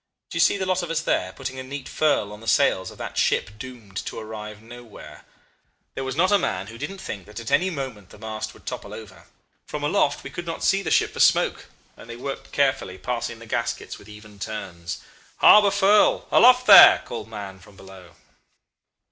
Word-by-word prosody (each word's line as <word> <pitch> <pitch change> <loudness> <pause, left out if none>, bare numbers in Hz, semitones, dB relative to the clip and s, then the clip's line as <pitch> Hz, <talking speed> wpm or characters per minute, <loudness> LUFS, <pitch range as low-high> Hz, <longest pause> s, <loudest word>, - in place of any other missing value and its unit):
Do - - -7
you - - -1
see - - +4
the 190 - -2
lot 185 0 0
of 175 - -6
us 165 -1 -1
there, 95 - -1
putting 130 +4 -7
a - - -6
neat 135 +1 -7
furl 145 -9 0
on 105 - -11
the 115 - -12
sails 95 -9 +2
of - - -14
that - - -5
ship 95 - +1
doomed 120 -6 -11
to - - -6
arrive 105 -1 -8
nowhere? 115 -9 -13 0.7
There 135 - -5
was 130 0 -4
not 185 +5 +2
a 205 - +4
man 95 - -2
who 115 +3 -11
didn't 170 +8 -6
think 105 - -8
that 105 +2 -9
at 115 +1 -7
any 175 +7 +3
moment 130 - -7
the - - -15
masts 110 0 -6
would - - -19
topple - - -7
over. - - -13 0.4
From 150 -1 -6
aloft 165 +8 0
we - - -8
could 175 0 -7
not 165 - -5
see 195 - +2
the 185 - -4
ship - - +2
for - - -8
smoke, - - +2 0.3
and 115 - -15
they 115 - -7
worked 135 +2 -7
carefully, 135 -9 0
passing 120 0 -4
the 115 - -13
gaskets 110 - -4
with 100 - -16
even 105 -1 -14
turns. 90 -5 -6 0.3
'Harbour 210 -1 +7
furl 200 +1 +3
aloft 250 +1 +6
there!' 200 -4 +9
cried 115 -2 -7
Mahon 100 -3 -8
from 95 +1 -18
below. 95 -3 -15
115 Hz, 210 wpm, -23 LUFS, 105-155 Hz, 0.7 s, there